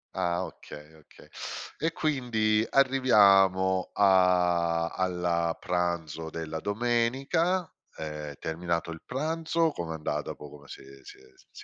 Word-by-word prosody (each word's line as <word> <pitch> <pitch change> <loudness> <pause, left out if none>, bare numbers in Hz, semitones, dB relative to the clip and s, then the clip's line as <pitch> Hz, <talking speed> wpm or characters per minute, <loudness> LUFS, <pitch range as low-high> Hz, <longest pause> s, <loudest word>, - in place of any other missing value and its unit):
Ah 85 0 0
okay, 75 +1 -12
okay. 80 -2 -19 0.5
E 165 +2 0
quindi 120 -9 +1
arriviamo 100 -8 +4
a 90 -3 +3
alla 90 -3 -1
pranzo 85 -2 -2
della 80 0 -5
domenica, 120 - 0 0.3
ehm, 75 -1 -6
terminato 85 0 -3
il 80 - -9
pranzo, 160 +4 -1
com'è 85 - -5
andata 75 -1 -3
po 75 - -11
come 70 -1 -14
si - - -10
è 70 0 -14
si - - -12
è - - -20 0.3
si - - -13
90 Hz, 125 wpm, -28 LUFS, 80-120 Hz, 0.5 s, arriviamo